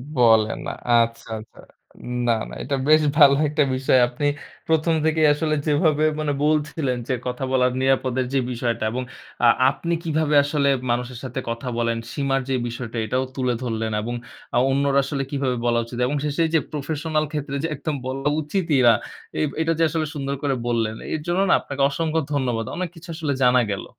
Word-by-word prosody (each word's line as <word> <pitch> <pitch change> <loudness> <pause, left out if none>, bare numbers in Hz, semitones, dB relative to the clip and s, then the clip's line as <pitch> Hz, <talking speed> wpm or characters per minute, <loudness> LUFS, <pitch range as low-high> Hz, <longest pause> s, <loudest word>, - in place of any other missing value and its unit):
বলেন 110 -3 +4
না। - - -2 0.2
আচ্ছা, 115 -1 +2
আচ্ছা। 110 - -15 0.7
না, - - +4 0.2
না, - - -10
এটা 140 +2 -1
বেশ 155 0 +7 0.2
ভালো 140 -3 +8
একটা 150 0 +2
বিষয়। 130 0 +3
আপনি 125 +4 -4 0.4
১ম 160 +1 +2
থেকেই 160 -1 +3
আসলে 155 +1 0
যেভাবে 150 0 +2 0.2
মানে 150 -1 0
বলছিলেন 150 -3 0
যে, 130 - 0
কথা 125 +2 -3
বলার 125 -1 +3
নিরাপদের 130 -1 +1
যে 135 - +3
বিষয়টা, 115 -1 -2
এবং 125 +2 -2 0.4
আ - - +7 0.2
আপনি 170 +4 -3
কিভাবে 155 -2 +1
আসলে 145 -1 +1 0.2
মানুষের 120 0 -2
সাথে 130 +1 -4
কথা 115 +3 -4
বলেন, 115 -1 0 0.2
সীমার 135 -1 0
যে - - +1
বিষয়টা 120 0 -6
এটাও 130 +4 0
তুলে 125 -2 0
ধরলেন, 115 -2 -2
এবং 120 +2 -4 0.4
আ - - +4
অন্যরা 140 0 +2
আসলে 135 -1 -2
কিভাবে 135 -3 0
বলা 120 0 +2
উচিত 120 +1 -8
এবং 145 - -1
শেষে 150 +3 0
যে 160 - +6
প্রফেশনাল 155 +1 -2
ক্ষেত্রে 145 -2 -3
যে 165 - +1
একদম 145 +1 -3
বলা 135 +2 -2
উচিতই 155 -2 0
না, 115 - +8 0.5
এইব 150 - +1
এটা 165 +1 +1
যে 165 - +4
আসলে 160 0 -1
সুন্দর 140 -1 -2
করে 135 -2 +1
বললেন, 115 -2 0 0.2
এর 155 - -2
জন্য 175 +2 +1
না? - - +6
আপনাকে 140 -1 -5
অসংখ্য 160 +2 -1
ধন্যবাদ। 120 -5 0
অনেক 180 -1 -3
কিছু 165 +1 -13
আসলে 155 -4 -1
জানা 125 0 +5
গেল। 100 - -4
140 Hz, 185 wpm, -23 LUFS, 125-155 Hz, 0.7 s, ভালো